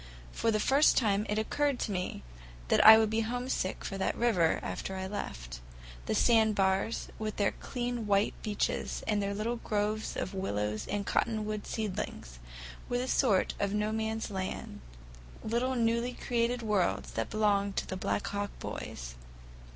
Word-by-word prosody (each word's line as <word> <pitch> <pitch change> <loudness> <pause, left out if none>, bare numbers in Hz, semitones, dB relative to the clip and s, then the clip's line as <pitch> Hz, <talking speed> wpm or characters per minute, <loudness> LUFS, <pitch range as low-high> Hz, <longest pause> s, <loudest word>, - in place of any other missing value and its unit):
For 230 - 0
the 215 -1 +2
first 275 +7 +4
time 210 -2 +2
it 210 - 0
occurred 280 +5 +1
to - - -1
me 180 - -3 0.5
that - - +5
I 220 +1 +11
would 220 -1 +2
be 220 - +1
homesick 245 -3 -2
for 195 - -4
that - - 0
river 200 -9 +3
after 190 - -4
I 190 0 -3
left - - -5
it. - - -14 0.5
The - - +1
sandbars, 215 -3 +2
with 215 -1 -3
their 200 -2 +2
clean 240 -3 -4
white 200 0 +3
beaches 210 -1 -2
and 210 -2 +1
their 200 0 -2
little 230 +4 -1
groves 215 0 -2
of 190 - -3
willows 105 - -2
and 205 -1 -2
cottonwood 215 -1 -1
seedlings, 185 - -4 0.5
were 245 - +1
a - - -4
sort 220 -8 +2
of 200 0 0
No 210 +1 0
Man's 220 0 -2
Land, 190 -1 -5 0.6
little 245 +4 0
newly 235 +1 +1
created 240 0 -1
worlds 210 -4 0
that 115 - -2
belonged 200 -2 +1
to - - -1
the 190 - -4
Black 190 +2 -1
Hawk 205 0 -2
boys. - - -6
210 Hz, 165 wpm, -31 LUFS, 195-230 Hz, 0.6 s, I